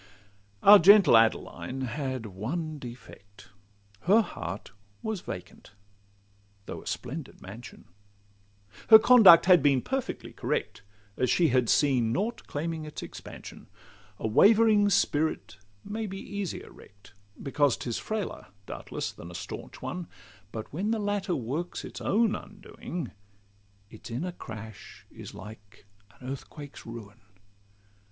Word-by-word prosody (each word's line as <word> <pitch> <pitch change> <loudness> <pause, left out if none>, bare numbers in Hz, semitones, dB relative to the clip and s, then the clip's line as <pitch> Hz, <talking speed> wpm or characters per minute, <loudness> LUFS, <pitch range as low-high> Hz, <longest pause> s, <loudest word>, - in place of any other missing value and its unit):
Our 205 +1 +10
gentle 195 - +7
Adeline 115 +3 +1
had 130 -1 -3
one 145 - -4
defect— 105 -6 -12 0.6
Her 210 +5 +6
heart 95 - -7 0.3
was 220 -4 -3
vacant, 90 +2 -9 0.9
though - - -7
a - - -14
splendid 135 +4 -6
mansion; 110 +6 -11 1.0
Her 220 - +11
conduct 220 -7 +8
had 180 -3 +6
been 135 -3 +3
perfectly 270 -1 -4
correct, - - -3 0.4
As 125 - +1
she 170 -3 +3
had 125 -2 +2
seen 130 -6 +3
nought 210 - -2
claiming 160 +2 -3
its 150 0 -7
expansion. - - -10 0.5
A - - -3
wavering 210 - +5
spirit 155 - 0 0.3
may 220 +1 -4
be 195 0 -6
easier 200 -2 -6
wreck'd, 100 +1 -18 0.3
Because 140 -2 +1
'tis 120 -2 -4
frailer, 215 - -4 0.2
doubtless, - - -5
than 85 - -11
a 85 - -10
stanch - - -8
one; 180 -2 -5 0.4
But 110 +3 -7
when 190 +8 -2
the 225 - +1
latter 205 -3 -1
works 140 +8 -4
its - - -9
own 220 +1 +2
undoing, 180 - -8 0.8
Its 110 - -11
inner 145 +11 -3
crash 110 - -10
is - - -10
like 105 +2 -13 0.3
an 130 - -10
earthquake's 140 +1 -8
ruin. 110 -3 -10
145 Hz, 125 wpm, -28 LUFS, -, 1.0 s, Her